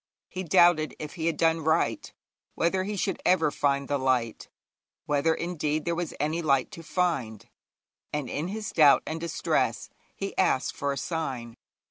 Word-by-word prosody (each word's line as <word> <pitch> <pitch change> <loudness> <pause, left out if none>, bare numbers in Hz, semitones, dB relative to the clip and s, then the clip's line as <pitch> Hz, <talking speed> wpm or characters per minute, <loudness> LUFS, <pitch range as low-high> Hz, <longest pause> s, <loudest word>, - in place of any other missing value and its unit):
He 185 - -5
doubted 175 -2 +4
if 150 -1 -7
he 165 -2 -3
had 165 - 0
done 165 0 +3
right, 160 +1 0 0.4
whether 185 +3 +1
he 210 +1 -3
should 190 -1 -2
ever 165 -5 +3
find 140 -1 0
the 145 -1 0
light, 125 -4 0 0.6
whether, 145 +2 +2
indeed, 155 -3 -2
there 170 - 0
was 170 -1 -3
any 155 +3 0
light 135 -5 +1
to 165 - -9
find, 155 - -2 0.6
and 150 -3 -3
in 150 +6 -3
his 210 +2 -5
doubt 150 -4 +6
and 160 +1 -4
distress 170 - -1 0.2
he 195 0 -5
asked 175 -8 +1
for 140 0 -1
a 140 - -3
sign. 130 -7 -4
160 Hz, 165 wpm, -27 LUFS, 140-170 Hz, 0.6 s, doubt